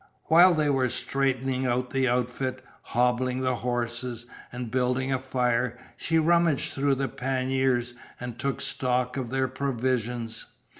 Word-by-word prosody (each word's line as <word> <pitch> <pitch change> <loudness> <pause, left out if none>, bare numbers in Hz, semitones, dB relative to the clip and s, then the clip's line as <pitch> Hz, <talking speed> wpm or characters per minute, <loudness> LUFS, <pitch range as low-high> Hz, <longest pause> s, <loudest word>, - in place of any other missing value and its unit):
While 175 +2 +7
they 155 -1 +2
were 130 -2 +2
straightening 130 0 0
out 125 +1 0
the 135 -1 +2
outfit, 125 +1 -1 0.2
hobbling 125 +1 +1
the 130 -1 0
horses, 120 0 -3 0.3
and 120 -2 -5
building 130 +1 +1
a 130 - 0
fire, 125 -2 0 0.2
she 165 - 0
rummaged 165 -2 +3
through 140 0 +2
the 135 0 -1
panniers 130 -2 0 0.3
and 120 -1 -6
took 140 +1 -2
stock 125 -1 -1
of 130 -4 -3
their 130 +1 +1
provisions. 125 -3 -2
130 Hz, 140 wpm, -27 LUFS, 125-135 Hz, 0.3 s, While